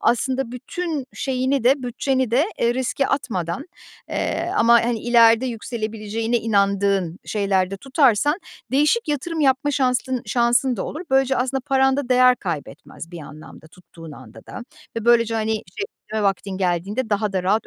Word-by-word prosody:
aslında 260 Hz, +1 st, 0 dB
bütün 300 Hz, +2 st, -4 dB
şeyini 260 Hz, -1 st, -1 dB
de 265 Hz, +2 st, +3 dB
bütçeni 255 Hz, 0 st, -1 dB
de, 260 Hz, +6 st, +3 dB, 0.2 s
eee, 235 Hz, +1 st, +2 dB
riske 260 Hz, +1 st, -1 dB
atmadan, 195 Hz, -, -2 dB, 0.4 s
eee, -, -, -2 dB
ama, 235 Hz, +1 st, +5 dB
hani, 235 Hz, -2 st, -1 dB
ileride 230 Hz, +1 st, +5 dB
yükselebileceğine 225 Hz, -1 st, -3 dB
inandığın 200 Hz, -4 st, +1 dB
şeylerde 195 Hz, -2 st, 0 dB
tutarsan 275 Hz, -, +2 dB, 0.3 s
değişik 300 Hz, -, +2 dB
yatırım 310 Hz, +3 st, -2 dB
yapma 275 Hz, 0 st, +2 dB
şansın 255 Hz, -2 st, 0 dB
şansın 240 Hz, +1 st, +2 dB
da -, -, -3 dB
olur. 310 Hz, -, -6 dB
Böylece 265 Hz, 0 st, +3 dB
aslında 260 Hz, +2 st, -1 dB
paranda 270 Hz, 0 st, +2 dB
değer 250 Hz, 0 st, +5 dB
kaybetmez 165 Hz, 0 st, -7 dB
bir 175 Hz, -, -8 dB
anlamda 155 Hz, +1 st, -12 dB
tuttuğun 165 Hz, -2 st, -14 dB
anda 130 Hz, -5 st, -14 dB
da -, -, -8 dB, 0.4 s
ve 230 Hz, -, -3 dB
böylece, 230 Hz, -1 st, +4 dB
hani, 220 Hz, -1 st, -1 dB, 0.5 s
çevirme 220 Hz, -1 st, -1 dB
vaktin 195 Hz, 0 st, -1 dB
geldiğinde 195 Hz, +6 st, -1 dB
daha 205 Hz, 0 st, 0 dB
da 185 Hz, -2 st, -1 dB
rahat 205 Hz, +4 st, +1 dB
235 Hz, 145 wpm, -22 LUFS, 200-265 Hz, 0.5 s, ama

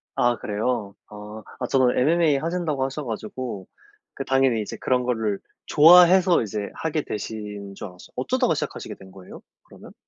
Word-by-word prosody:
아 120 Hz, 0 st, +2 dB
그래요? 105 Hz, -1 st, -2 dB, 0.2 s
아. 105 Hz, +1 st, -9 dB, 0.2 s
아 125 Hz, -, -2 dB
저도 130 Hz, -1 st, +3 dB
MMA 155 Hz, +2 st, +3 dB
하신다고 160 Hz, -3 st, -2 dB
하셔 135 Hz, +3 st, -3 dB
가지고 110 Hz, -3 st, -6 dB, 0.5 s
그 -, -, -5 dB
당연히 135 Hz, -4 st, +2 dB
이제 105 Hz, -, -6 dB
그런 125 Hz, -1 st, +1 dB
거를 110 Hz, -5 st, -1 dB, 0.3 s
좋아해서 175 Hz, +2 st, +6 dB
이제 105 Hz, -1 st, -4 dB
하게 160 Hz, -1 st, -2 dB
되신 105 Hz, -4 st, -6 dB
줄 100 Hz, -, -7 dB
알았어요. 90 Hz, -1 st, -15 dB
어쩌다가 -, -, +1 dB
시작하시게 -, -, -5 dB
된 95 Hz, 0 st, -15 dB
거예요? 95 Hz, -1 st, -12 dB, 0.2 s
그러면? -, -, -15 dB
125 Hz, 365 characters per minute, -24 LUFS, 105-145 Hz, 0.5 s, 좋아해서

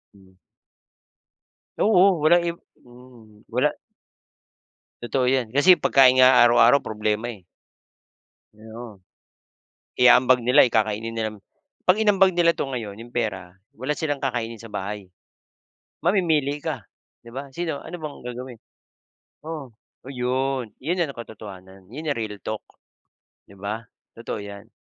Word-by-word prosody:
Hmm. 95 Hz, -1 st, -21 dB, 1.5 s
Oo 190 Hz, -5 st, +4 dB
walang 175 Hz, +2 st, +5 dB
imp 170 Hz, 0 st, -4 dB, 0.2 s
hmm. 120 Hz, -4 st, -18 dB
Wala. -, -, +1 dB, 1.3 s
Totoo 125 Hz, +1 st, 0 dB
'yan. 130 Hz, -2 st, +1 dB
Kasi 155 Hz, +7 st, +6 dB
pagkain 130 Hz, -6 st, +5 dB
nga 130 Hz, 0 st, +7 dB
araw-araw 120 Hz, +3 st, +5 dB
problema 110 Hz, 0 st, -2 dB
eh. 100 Hz, -5 st, -13 dB, 1.1 s
Oo. 110 Hz, -2 st, -11 dB, 0.9 s
Iaambag 125 Hz, 0 st, +5 dB
nila, 125 Hz, +3 st, +5 dB
eh, 120 Hz, -, -5 dB
kakainin 110 Hz, +1 st, 0 dB
nilang 110 Hz, -2 st, -3 dB, 0.5 s
'pag 185 Hz, +4 st, +4 dB
inambag 195 Hz, -3 st, +4 dB
nila 170 Hz, -1 st, +4 dB
'to -, -, -2 dB
ngayon, 110 Hz, -6 st, -6 dB
yung 120 Hz, +1 st, -12 dB
pera, 95 Hz, -6 st, -3 dB, 0.2 s
wala 130 Hz, +5 st, -2 dB
silang 145 Hz, -2 st, -2 dB
kakainin 115 Hz, -4 st, -3 dB
sa 115 Hz, -1 st, -12 dB
bahay. 100 Hz, 0 st, -5 dB, 1.0 s
Mamimili 155 Hz, -6 st, +1 dB
ka, 150 Hz, -10 st, -5 dB, 0.4 s
'di 115 Hz, -, -12 dB
ba? 135 Hz, +1 st, -7 dB
Sino 160 Hz, -1 st, -4 dB
ano -, -, -8 dB
bang 155 Hz, -3 st, -7 dB
gagawin? 125 Hz, -1 st, -8 dB, 0.9 s
Oo 150 Hz, -7 st, -7 dB, 0.4 s
'yon, 130 Hz, -2 st, -2 dB
'yon 165 Hz, +6 st, -1 dB
na 165 Hz, -, +1 dB
ang 140 Hz, -, -9 dB
katotohanan. 95 Hz, -4 st, -11 dB
Yun 145 Hz, +8 st, -8 dB
na 145 Hz, -, +1 dB
real 105 Hz, -2 st, -4 dB
talk, 110 Hz, -1 st, -5 dB, 0.8 s
'di 100 Hz, -, -16 dB
ba? 105 Hz, +3 st, -5 dB, 0.3 s
Totoo -, -, -6 dB
'yan. 100 Hz, +1 st, -10 dB
125 Hz, 130 wpm, -23 LUFS, 110-145 Hz, 1.5 s, nga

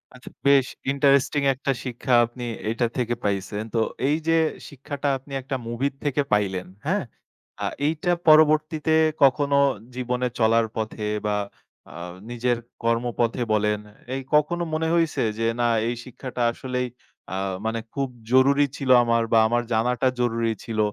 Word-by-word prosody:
আচ্ছা, 125 Hz, -, -12 dB, 0.2 s
বেশ 140 Hz, -2 st, +6 dB, 0.3 s
ইন্টারেস্টিং 140 Hz, +1 st, +3 dB
একটা 135 Hz, +1 st, -2 dB
শিক্ষা 125 Hz, 0 st, -2 dB
আপনি 120 Hz, +1 st, -9 dB, 0.3 s
এইটা 115 Hz, +1 st, 0 dB
থেকে 120 Hz, -1 st, 0 dB
পাইছেন। 100 Hz, +1 st, -2 dB
তো 115 Hz, -, +1 dB, 0.3 s
এই 150 Hz, -, +3 dB
যে 165 Hz, -, +4 dB, 0.3 s
শিক্ষাটা 145 Hz, +1 st, -5 dB
আপনি 135 Hz, +2 st, -18 dB
একটা 135 Hz, +1 st, -4 dB
মুভি'র 130 Hz, +4 st, -1 dB
থেকে 145 Hz, 0 st, +1 dB
পাইলেন, 95 Hz, -3 st, 0 dB, 0.2 s
হ্যাঁ? 195 Hz, +3 st, 0 dB, 0.6 s
আ -, -, 0 dB, 0.2 s
এইটা 160 Hz, +3 st, 0 dB, 0.2 s
পরবর্তীতে 155 Hz, 0 st, +4 dB, 0.3 s
কখনো 140 Hz, +1 st, +4 dB, 0.4 s
জীবনে 125 Hz, 0 st, -1 dB
চলার 115 Hz, 0 st, +4 dB
পথে 110 Hz, -1 st, -3 dB, 0.2 s
বা 105 Hz, 0 st, +1 dB, 0.6 s
আ -, -, -12 dB, 0.4 s
নিজের 120 Hz, 0 st, 0 dB, 0.3 s
কর্মপথে 115 Hz, +1 st, 0 dB
বলেন, 105 Hz, 0 st, +1 dB, 0.4 s
এই 135 Hz, -, -3 dB
কখনো 165 Hz, +4 st, +2 dB
মনে 160 Hz, +1 st, 0 dB
হইছে 165 Hz, -2 st, +1 dB, 0.2 s
যে, 115 Hz, -, 0 dB
না 120 Hz, -, +3 dB, 0.2 s
এই 120 Hz, -, -1 dB
শিক্ষাটা 125 Hz, 0 st, -6 dB
আসলেই 125 Hz, 0 st, -3 dB, 0.5 s
আ -, -, -2 dB, 0.3 s
মানে 115 Hz, +1 st, -1 dB
খুব 135 Hz, -2 st, -1 dB, 0.2 s
জরুরি 140 Hz, +2 st, +5 dB
ছিল 135 Hz, -2 st, -4 dB
আমার 115 Hz, -1 st, +2 dB
বা 115 Hz, -, +7 dB
আমার 120 Hz, +1 st, +1 dB
জানাটা 125 Hz, +3 st, +1 dB
জরুরি 115 Hz, -2 st, +1 dB
ছিল? 115 Hz, -3 st, -4 dB
125 Hz, 145 wpm, -24 LUFS, 115-140 Hz, 0.6 s, বা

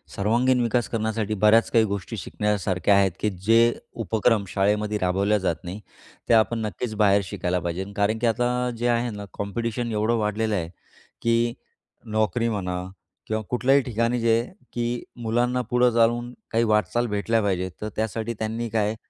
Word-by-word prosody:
सर्वांगीण 120 Hz, +5 st, +2 dB
विकास 120 Hz, 0 st, +1 dB
करण्यासाठी 110 Hz, -1 st, -1 dB
बऱ्याच 105 Hz, +2 st, +5 dB
काही 115 Hz, -2 st, +5 dB
गोष्टी 100 Hz, -3 st, -4 dB
शिकण्यासारख्या 100 Hz, -2 st, 0 dB
आहेत, 100 Hz, -1 st, +4 dB
की 105 Hz, -, +1 dB
जे 115 Hz, +5 st, +3 dB, 0.3 s
उपक्रम 110 Hz, 0 st, +1 dB
शाळेमध्ये 105 Hz, +3 st, 0 dB
राबवल्या 100 Hz, +3 st, +2 dB
जात 95 Hz, -4 st, 0 dB
नाहीत, 95 Hz, +4 st, -7 dB, 0.5 s
ते -, -, +5 dB
आपण 115 Hz, +1 st, +3 dB
नक्कीच 110 Hz, +3 st, -4 dB
बाहेर 100 Hz, -1 st, +4 dB
शिकायला 90 Hz, +1 st, -2 dB
पाहिजे. 90 Hz, +2 st, -3 dB
कारण 100 Hz, +2 st, +2 dB
की 120 Hz, -, +1 dB
आता 120 Hz, +2 st, +1 dB, 0.3 s
जे 120 Hz, +1 st, 0 dB
आहे 120 Hz, +1 st, +1 dB
ना, 105 Hz, -1 st, -7 dB
कॉम्पिटिशन 115 Hz, +3 st, -3 dB
एवढं 110 Hz, +2 st, +1 dB
वाढलेलं 105 Hz, 0 st, 0 dB
आहे, 85 Hz, -4 st, -2 dB, 0.5 s
की 115 Hz, 0 st, +2 dB, 0.6 s
नोकरी 110 Hz, +2 st, +1 dB
म्हणा 90 Hz, -4 st, -3 dB, 0.4 s
किंवा 110 Hz, 0 st, -1 dB
कुठल्याही 135 Hz, +3 st, +3 dB
ठिकाणी 120 Hz, 0 st, 0 dB
जे, 115 Hz, 0 st, +3 dB, 0.3 s
की 120 Hz, 0 st, -2 dB, 0.2 s
मुलांना 120 Hz, +3 st, +1 dB
पुढं 125 Hz, 0 st, +4 dB
चालून 120 Hz, +1 st, +2 dB, 0.2 s
काही 115 Hz, +1 st, +2 dB
वाटचाल 115 Hz, +2 st, +1 dB
भेटल्या 115 Hz, +2 st, +1 dB
पाहिजे, 95 Hz, -2 st, 0 dB
तर 105 Hz, -, -3 dB
त्यासाठी 110 Hz, +1 st, -2 dB
त्यांनी 115 Hz, +2 st, -3 dB
काय, 110 Hz, 0 st, 0 dB
110 Hz, 155 wpm, -24 LUFS, 100-115 Hz, 0.6 s, बऱ्याच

